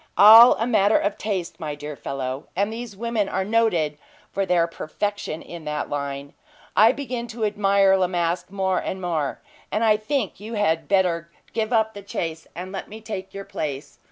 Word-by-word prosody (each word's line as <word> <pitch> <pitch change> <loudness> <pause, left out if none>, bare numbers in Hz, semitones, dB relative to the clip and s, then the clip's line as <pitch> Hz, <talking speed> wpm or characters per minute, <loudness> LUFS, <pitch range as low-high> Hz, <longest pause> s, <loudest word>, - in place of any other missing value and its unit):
"All 225 +4 +10
a 225 - -1
matter 215 -3 +4
of 205 - -1
taste, 185 -5 -3
my 150 -3 -4
dear 150 0 -7
fellow: 135 0 -5
and 200 +4 0
these 230 -3 -7
women 230 -2 -1
are 190 0 -1
noted 180 -9 +1 0.3
for 195 -1 -1
their 175 -2 +3
perfection 170 +1 -4
in 170 -2 -9
that 150 0 -3
line. 140 -1 -4 0.4
I 220 +2 +7
begin 250 -3 -4
to 225 -1 -3
admire 200 -2 +3
La 185 -1 +2
Masque 175 0 -1
more 190 -1 0
and 190 - -4
more, 165 -6 -2 0.3
and 215 - 0
I 215 -1 +4
think 215 -2 -2
you 220 +3 -7
had 165 -6 +1
better 175 -4 +1 0.2
give 220 0 -1
up 220 -2 +2
the 205 - -8
chase, 165 -4 -5
and 185 +2 -6
let 195 - -6
me 215 +2 -9
take 205 -4 -6
your 195 0 -6
place. 145 -2 -5
195 Hz, 185 wpm, -23 LUFS, 165-215 Hz, 0.4 s, All